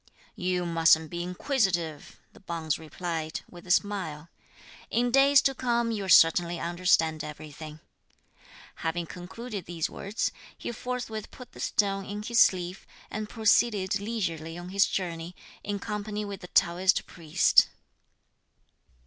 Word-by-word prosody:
"You 180 Hz, -1 st, -1 dB
mustn't 160 Hz, -1 st, +4 dB
be 175 Hz, 0 st, -3 dB
inquisitive," 180 Hz, -, -1 dB, 0.2 s
the -, -, -16 dB
bonze 165 Hz, -4 st, -3 dB
replied, 160 Hz, -1 st, -4 dB
with 175 Hz, +1 st, -14 dB
a -, -, -11 dB
smile, 175 Hz, -6 st, 0 dB, 0.6 s
"in 245 Hz, +1 st, +1 dB
days 275 Hz, +1 st, +6 dB
to 270 Hz, -, +2 dB
come 235 Hz, -2 st, 0 dB
you'll 200 Hz, -4 st, -3 dB
certainly 170 Hz, 0 st, +5 dB
understand 170 Hz, -2 st, +1 dB
everything." 150 Hz, 0 st, -9 dB, 1.0 s
Having 165 Hz, +1 st, -2 dB
concluded 190 Hz, +4 st, -7 dB
these 165 Hz, -2 st, -2 dB
words, 205 Hz, +3 st, -2 dB, 0.3 s
he -, -, -5 dB
forthwith 235 Hz, -2 st, -5 dB
put 250 Hz, -3 st, -12 dB
the -, -, -14 dB
stone 195 Hz, -1 st, 0 dB
in 205 Hz, +1 st, -5 dB
his 235 Hz, +1 st, +1 dB
sleeve, 180 Hz, 0 st, +2 dB, 0.2 s
and 215 Hz, 0 st, -4 dB
proceeded 215 Hz, -3 st, +2 dB
leisurely 170 Hz, -7 st, -3 dB
on 175 Hz, +1 st, -8 dB
his 195 Hz, +1 st, +3 dB
journey, 175 Hz, -1 st, -4 dB, 0.3 s
in 205 Hz, 0 st, -2 dB
company 210 Hz, +1 st, -4 dB
with 200 Hz, -2 st, -7 dB
the 180 Hz, -, -8 dB
Taoist 180 Hz, +3 st, +3 dB
priest. 160 Hz, -3 st, +3 dB
180 Hz, 130 wpm, -28 LUFS, 165-210 Hz, 1.0 s, days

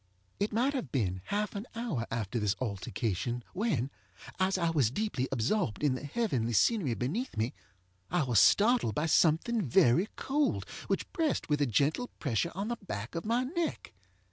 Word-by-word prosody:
It 205 Hz, -, 0 dB
might 245 Hz, +6 st, +1 dB
have 215 Hz, -, -3 dB
been 95 Hz, -8 st, -1 dB
half 210 Hz, 0 st, -1 dB
an 205 Hz, +3 st, -5 dB
hour 210 Hz, -, -2 dB
after 115 Hz, 0 st, -2 dB
this 105 Hz, -2 st, +1 dB
altercation 115 Hz, +1 st, -2 dB
when, 160 Hz, -, 0 dB, 0.5 s
as 190 Hz, +1 st, +2 dB
I 170 Hz, -2 st, +1 dB
was 140 Hz, -9 st, +3 dB
deeply 140 Hz, -, -1 dB
absorbed 135 Hz, -, 0 dB
in 145 Hz, -3 st, +3 dB
the 130 Hz, -, -5 dB
heavenly 140 Hz, -, -1 dB
scenery 155 Hz, -, +3 dB
beneath 170 Hz, -, -3 dB
me, 110 Hz, +3 st, 0 dB, 0.6 s
I -, -, +2 dB
was 120 Hz, -6 st, +3 dB
startled 210 Hz, -, +4 dB
by 150 Hz, -, 0 dB
something 165 Hz, +9 st, +3 dB
very 130 Hz, -, +4 dB
cold 290 Hz, +2 st, 0 dB, 0.2 s
which -, -, -2 dB
pressed 320 Hz, -, 0 dB
with 150 Hz, -1 st, +1 dB
a 145 Hz, -, +3 dB
gentle 145 Hz, -, +1 dB
pressure 140 Hz, +4 st, 0 dB
on 200 Hz, +4 st, -3 dB
the 240 Hz, -, -2 dB
back 110 Hz, -, -6 dB
of 165 Hz, -, -4 dB
my 235 Hz, +3 st, +2 dB
neck. 330 Hz, +5 st, -3 dB
155 Hz, 170 wpm, -31 LUFS, -, 0.6 s, startled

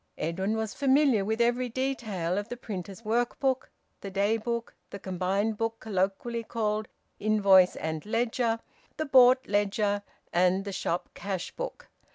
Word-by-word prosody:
Edwin 190 Hz, +7 st, -1 dB
was 220 Hz, -1 st, -2 dB
familiar 270 Hz, -5 st, +3 dB
with 220 Hz, +3 st, -1 dB
every 240 Hz, +1 st, +2 dB
detail 220 Hz, -9 st, -2 dB
of 205 Hz, +2 st, -6 dB
the 245 Hz, -, -5 dB
printer's 200 Hz, -1 st, -7 dB
work 235 Hz, +2 st, 0 dB
book, 265 Hz, -1 st, 0 dB, 0.3 s
the 200 Hz, -, -6 dB
daybook, 225 Hz, +4 st, -1 dB, 0.2 s
the -, -, -7 dB
combined 195 Hz, +3 st, -1 dB
book 225 Hz, 0 st, -1 dB
colloquially 210 Hz, +3 st, -1 dB
called 215 Hz, -1 st, -1 dB, 0.3 s
`invoice 200 Hz, -4 st, +5 dB
and 160 Hz, -1 st, -3 dB
ledger,' 230 Hz, +1 st, 0 dB, 0.4 s
the 310 Hz, -, -1 dB
`bought' 260 Hz, -1 st, +6 dB
ledger, 205 Hz, 0 st, +1 dB, 0.3 s
and 185 Hz, +2 st, +3 dB
the 200 Hz, -, -4 dB
shop 175 Hz, -1 st, -2 dB
cash 190 Hz, -1 st, -4 dB
book. -, -, -6 dB
215 Hz, 145 wpm, -28 LUFS, 195-235 Hz, 0.4 s, `bought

